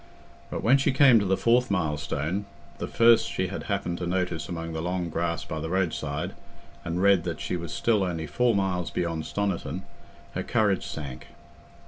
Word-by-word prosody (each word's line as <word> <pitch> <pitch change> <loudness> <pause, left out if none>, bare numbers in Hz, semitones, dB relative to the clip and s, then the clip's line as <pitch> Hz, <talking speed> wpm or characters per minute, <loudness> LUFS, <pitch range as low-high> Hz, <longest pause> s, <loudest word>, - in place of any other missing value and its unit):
But - - -4
when 130 +5 +5
she 135 - +2
came 130 -3 +6
to 100 - -1
the 95 0 +2
fourth 120 +2 +3
milestone, 80 +1 -1 0.3
the - - -3
first 115 -1 +5
she 95 -1 -1
had 100 - -5
happened 100 -4 -1
to 85 - -3
notice 90 -4 -1
among 85 -2 -4
the 80 - -3
long 90 0 -2
grass 85 +1 -1
by 80 - -4
the 80 +1 -4
roadside, 80 -5 -1 0.5
and 90 +2 -2
read 100 -4 +5
that 85 - -3
she - - -2
was 85 -2 -5
still 110 -3 +2
only 85 -3 -2
four 120 +9 +2
miles 95 -3 0
beyond 85 -2 -2
Stoniton, 95 -4 -2 0.5
her - - -2
courage 100 -4 +1
sank. 70 -5 -7
90 Hz, 180 wpm, -27 LUFS, 80-100 Hz, 0.5 s, came